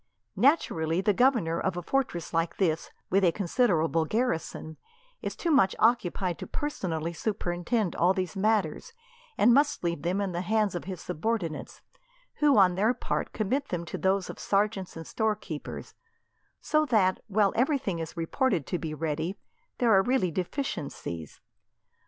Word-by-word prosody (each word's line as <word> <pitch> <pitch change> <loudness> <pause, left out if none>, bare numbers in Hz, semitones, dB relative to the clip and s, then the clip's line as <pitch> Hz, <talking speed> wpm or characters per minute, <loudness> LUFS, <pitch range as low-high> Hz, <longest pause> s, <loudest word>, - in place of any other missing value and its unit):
Naturally, 170 - +2
the 200 +2 +2
governor 220 -9 +2
of 190 -2 -1
a 175 - -4
fortress 210 -10 -1
like 165 0 0
this, 165 -4 0 0.2
with 195 +1 +3
a 175 - +5
considerable 170 -5 +1
garrison, 165 -7 -2 0.4
is - - -4
too 340 - -1
much 195 -10 +4
occupied 190 -6 +1
to - - -6
personally 170 - -3
superintend 185 +1 -1
all 175 +2 +4
these 185 -1 -2
matters, 210 - 0 0.4
and 235 +3 +6
must 290 -1 +2
leave 170 -3 -1
them 180 +3 0
in 200 -2 -1
the 175 0 -2
hands 210 +2 +1
of 175 - -5
his 185 -2 -6
subordinates, 180 -2 -3 0.6
who 290 -5 +4
on 185 -3 +6
their 215 +7 +2
part - - -2
commit 260 +7 -1
them 170 -1 -3
to - - -5
those 190 0 +1
of - - -8
sergeants 200 -3 0
and 165 - -7
storekeepers; 210 -8 -3 0.7
so 305 0 +2
that, 215 -9 +2
while 205 -2 +2
everything 250 - +1
is 165 +1 -6
reported 170 - 0
to 180 - -2
be 155 -2 -4
ready, 160 +4 -2 0.4
there 235 -3 +3
are 190 - +6
really 245 -5 +1
deficiencies. 160 - -4
190 Hz, 155 wpm, -28 LUFS, 170-225 Hz, 0.7 s, and